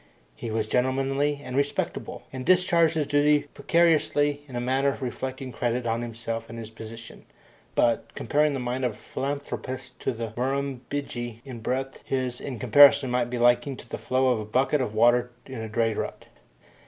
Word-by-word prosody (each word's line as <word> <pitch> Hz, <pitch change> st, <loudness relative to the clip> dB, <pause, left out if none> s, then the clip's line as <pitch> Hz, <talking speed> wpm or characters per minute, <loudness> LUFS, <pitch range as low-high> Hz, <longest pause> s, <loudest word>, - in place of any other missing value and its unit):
He 115 Hz, -, -6 dB
was 110 Hz, 0 st, 0 dB
gentlemanly 135 Hz, +4 st, 0 dB
and 130 Hz, -1 st, -6 dB
respectable, 140 Hz, +1 st, -2 dB
and 130 Hz, -1 st, -4 dB
discharged 170 Hz, -1 st, +4 dB
his 155 Hz, -2 st, +1 dB
duties 145 Hz, 0 st, +3 dB
punctiliously 150 Hz, -3 st, +2 dB
in 130 Hz, -, -9 dB
a -, -, -1 dB
manner 135 Hz, +3 st, +1 dB
reflecting 130 Hz, 0 st, -4 dB
credit 120 Hz, +1 st, -1 dB
on 115 Hz, 0 st, 0 dB
himself 115 Hz, -1 st, -5 dB
and 115 Hz, -, -8 dB
his 110 Hz, -1 st, -7 dB
position, 115 Hz, 0 st, -10 dB, 0.5 s
but, -, -, +2 dB
comparing 150 Hz, 0 st, +2 dB
the 135 Hz, -, -2 dB
mind 125 Hz, +1 st, -2 dB
of 125 Hz, -3 st, +1 dB
a -, -, -14 dB
philanthropist 130 Hz, -2 st, -5 dB
to -, -, -1 dB
the 115 Hz, -2 st, -5 dB
Murrumbidgee 130 Hz, -2 st, -3 dB
in 130 Hz, -4 st, -7 dB
breadth, 130 Hz, +4 st, -3 dB
his, 130 Hz, -2 st, -2 dB
in 130 Hz, -4 st, -5 dB
comparison, 140 Hz, +3 st, +6 dB
might 125 Hz, -1 st, +1 dB
be 125 Hz, -, -3 dB
likened 120 Hz, +2 st, +3 dB
to 120 Hz, -, -13 dB
the -, -, -5 dB
flow 130 Hz, 0 st, +2 dB
of 125 Hz, -3 st, +2 dB
a 105 Hz, -, -5 dB
bucket 130 Hz, +6 st, +1 dB
of 110 Hz, -4 st, -3 dB
water 120 Hz, +2 st, +4 dB, 0.2 s
in 130 Hz, -4 st, -7 dB
a 110 Hz, -, -5 dB
dray 115 Hz, 0 st, +1 dB
rut. -, -, -5 dB
130 Hz, 180 wpm, -26 LUFS, 120-140 Hz, 0.5 s, comparison